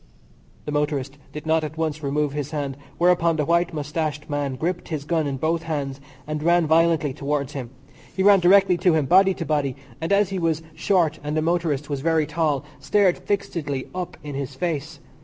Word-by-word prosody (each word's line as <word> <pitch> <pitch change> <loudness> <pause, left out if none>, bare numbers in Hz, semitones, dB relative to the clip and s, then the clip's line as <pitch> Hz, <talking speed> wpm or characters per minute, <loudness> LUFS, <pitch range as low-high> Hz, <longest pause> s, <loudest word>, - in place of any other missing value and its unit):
The 150 - -4
motorist 145 -2 -1
did 150 - -8
not 160 0 +2
at 155 +1 -5
once 155 -1 -2
remove 145 0 0
his 145 -1 -3
hand, 145 -3 -3 0.2
whereupon 170 -1 +3
the 150 -2 0
white 170 +2 +2
moustached 150 -1 -3
man 145 -2 -1
gripped 175 +6 -3
his 155 -4 -3
gun 160 -1 0
in 135 -1 -2
both 160 +4 0
hands 140 -4 -4 0.2
and 155 0 -3
ran 170 +1 +3
violently 160 -2 +3
towards 140 +1 -2
him. 130 -4 -5 0.5
He 190 - +2
ran 200 0 +7
directly 185 0 +5
to 175 -2 +4
him, 155 -3 +2
body 190 +5 +5
to 165 - -4
body, 145 -4 0 0.3
and, 165 - -2
as 200 -1 +4
he 190 -1 -2
was 165 -2 0
short 175 -4 +1
and 150 +1 -2
the 155 - +1
motorist 160 -4 0
was 140 -2 -3
very 160 0 +2
tall, 150 -3 0
stared 180 +6 +2
fixedly 160 -9 -3
up 180 -1 -5
in 145 -1 -6
his 135 -1 -4
face. 155 -1 -3
155 Hz, 195 wpm, -23 LUFS, 145-170 Hz, 0.5 s, ran